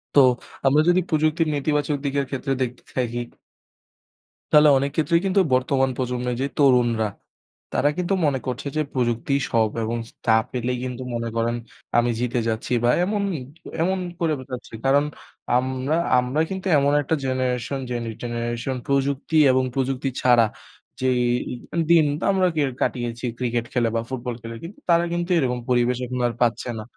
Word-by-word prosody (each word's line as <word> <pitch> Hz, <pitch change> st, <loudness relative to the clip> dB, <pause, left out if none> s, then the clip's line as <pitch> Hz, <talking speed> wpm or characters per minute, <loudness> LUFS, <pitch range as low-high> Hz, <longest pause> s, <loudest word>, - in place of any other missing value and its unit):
তো, -, -, +8 dB, 0.5 s
আমরা 140 Hz, +3 st, +5 dB
যদি 180 Hz, +1 st, +4 dB
প্রযুক্তির 155 Hz, +1 st, +2 dB
নেতিবাচক 145 Hz, +1 st, 0 dB
দিকের 140 Hz, 0 st, 0 dB
ক্ষেত্রে 135 Hz, 0 st, -2 dB
দেখতে 125 Hz, -1 st, -3 dB
থাকি। 120 Hz, -2 st, -1 dB, 1.3 s
তাহলে 150 Hz, 0 st, +7 dB
অনেক 140 Hz, +1 st, -1 dB
ক্ষেত্রেই 165 Hz, +2 st, +2 dB
কিন্তু 195 Hz, 0 st, +3 dB
বর্তমান 130 Hz, +1 st, +2 dB
প্রজন্মের 125 Hz, -1 st, -2 dB
যে 140 Hz, -, +1 dB
তরুণরা, 120 Hz, -5 st, +3 dB, 0.7 s
তারা 145 Hz, -, +3 dB
কিন্তু 180 Hz, +1 st, 0 dB
মনে 140 Hz, -3 st, +1 dB
করছে 125 Hz, +2 st, -3 dB
যে -, -, +3 dB
প্রযুক্তিই 125 Hz, +2 st, 0 dB
সব 110 Hz, -2 st, +3 dB
এবং 115 Hz, +2 st, -2 dB
স -, -, -19 dB
তা 110 Hz, -, +5 dB, 0.2 s
পেলেই 125 Hz, 0 st, -2 dB
কিন্তু 130 Hz, 0 st, -4 dB
মনে 115 Hz, 0 st, -2 dB
করেন 115 Hz, +1 st, +1 dB, 0.4 s
আমি 120 Hz, 0 st, +3 dB
জিতে 125 Hz, 0 st, 0 dB
যাচ্ছি 110 Hz, +2 st, -2 dB
বা 120 Hz, -, +4 dB
এমনই, 200 Hz, -3 st, -1 dB, 0.4 s
এমন 190 Hz, +3 st, +1 dB, 0.2 s
করে 165 Hz, -2 st, +1 dB
বেড়াচ্ছে। 125 Hz, -2 st, -8 dB
কারণ 140 Hz, +2 st, +4 dB, 0.5 s
আমরা, 130 Hz, +3 st, -1 dB, 0.2 s
আমরা 125 Hz, +5 st, 0 dB
কিন্তু 190 Hz, 0 st, -4 dB
এমন 140 Hz, 0 st, +3 dB
একটা 155 Hz, +3 st, 0 dB
generation, 130 Hz, +1 st, -1 dB
generation 120 Hz, +1 st, -3 dB
প্রযুক্তি 140 Hz, +3 st, 0 dB
এবং 130 Hz, 0 st, +2 dB
প্রযুক্তি 135 Hz, 0 st, -1 dB
ছাড়া 120 Hz, -2 st, +5 dB, 0.6 s
যেই 130 Hz, -1 st, +2 dB, 0.7 s
দিন 165 Hz, -2 st, +6 dB, 0.3 s
আমরা 190 Hz, -1 st, +3 dB
কে 155 Hz, -, +2 dB, 0.2 s
কাটিয়েছি 120 Hz, -1 st, -2 dB
cricket 120 Hz, -2 st, -1 dB
খেলে 120 Hz, -2 st, +2 dB
বা 115 Hz, -, +1 dB
football 125 Hz, -2 st, -4 dB
খেলে 115 Hz, +1 st, -7 dB
কিন্তু 200 Hz, +11 st, -9 dB
তারা 170 Hz, 0 st, +5 dB
কিন্তু 175 Hz, +1 st, -2 dB
এরকম 125 Hz, -4 st, 0 dB
পরিবেশ 125 Hz, 0 st, +2 dB
এখন 125 Hz, +1 st, -4 dB
আর 120 Hz, -, -3 dB
পাচ্ছে 120 Hz, +1 st, +1 dB
না। -, -, -6 dB
130 Hz, 155 wpm, -23 LUFS, 120-145 Hz, 1.3 s, তো